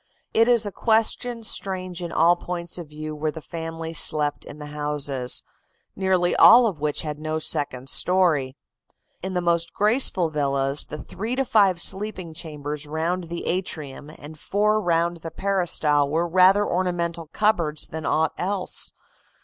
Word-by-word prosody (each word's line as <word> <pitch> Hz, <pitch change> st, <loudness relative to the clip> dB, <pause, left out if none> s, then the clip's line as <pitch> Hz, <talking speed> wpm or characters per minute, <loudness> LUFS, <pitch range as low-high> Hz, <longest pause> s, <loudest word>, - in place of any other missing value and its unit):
It 225 Hz, +1 st, +4 dB
is 235 Hz, -3 st, +4 dB
a 205 Hz, -, -3 dB
question 225 Hz, +2 st, +1 dB
strange 185 Hz, -4 st, -1 dB
in 170 Hz, -1 st, -5 dB
all 170 Hz, +2 st, +4 dB
points 175 Hz, 0 st, -4 dB
of 165 Hz, -4 st, -9 dB
view 155 Hz, 0 st, -7 dB
where 155 Hz, +1 st, -2 dB
the 160 Hz, -, -6 dB
family 165 Hz, +1 st, -6 dB
slept 150 Hz, -2 st, +1 dB
in 145 Hz, -, -10 dB
the 150 Hz, -, -8 dB
houses, 145 Hz, -4 st, -1 dB, 0.5 s
nearly 185 Hz, -2 st, +1 dB
all 240 Hz, +1 st, +8 dB
of 195 Hz, -9 st, -2 dB
which 150 Hz, +1 st, -1 dB
had 150 Hz, -1 st, -5 dB
no 155 Hz, 0 st, -3 dB
second 135 Hz, -4 st, -2 dB
story. 160 Hz, -7 st, +2 dB, 0.7 s
In 190 Hz, 0 st, -5 dB
the 180 Hz, -, +1 dB
most 170 Hz, -1 st, 0 dB
graceful 205 Hz, -6 st, +3 dB
villas 140 Hz, -1 st, -1 dB
the 150 Hz, -, -7 dB
three 220 Hz, +10 st, -5 dB
to 270 Hz, +1 st, 0 dB
five 200 Hz, -6 st, +3 dB
sleeping 190 Hz, -3 st, -1 dB
chambers 150 Hz, -2 st, -6 dB
round 165 Hz, +4 st, -2 dB
the 170 Hz, +1 st, -6 dB
atrium 155 Hz, -6 st, -4 dB
and 155 Hz, 0 st, -12 dB
four 210 Hz, +4 st, +1 dB
round 170 Hz, -1 st, 0 dB
the 165 Hz, 0 st, -7 dB
peristyle 165 Hz, -6 st, +1 dB
were 165 Hz, +3 st, 0 dB
rather 185 Hz, +4 st, +5 dB
ornamental 170 Hz, -3 st, -2 dB
cupboards 170 Hz, -6 st, 0 dB
than 160 Hz, 0 st, -7 dB
aught 160 Hz, +1 st, +1 dB
else. 190 Hz, 0 st, -4 dB
170 Hz, 155 wpm, -23 LUFS, 150-190 Hz, 0.7 s, all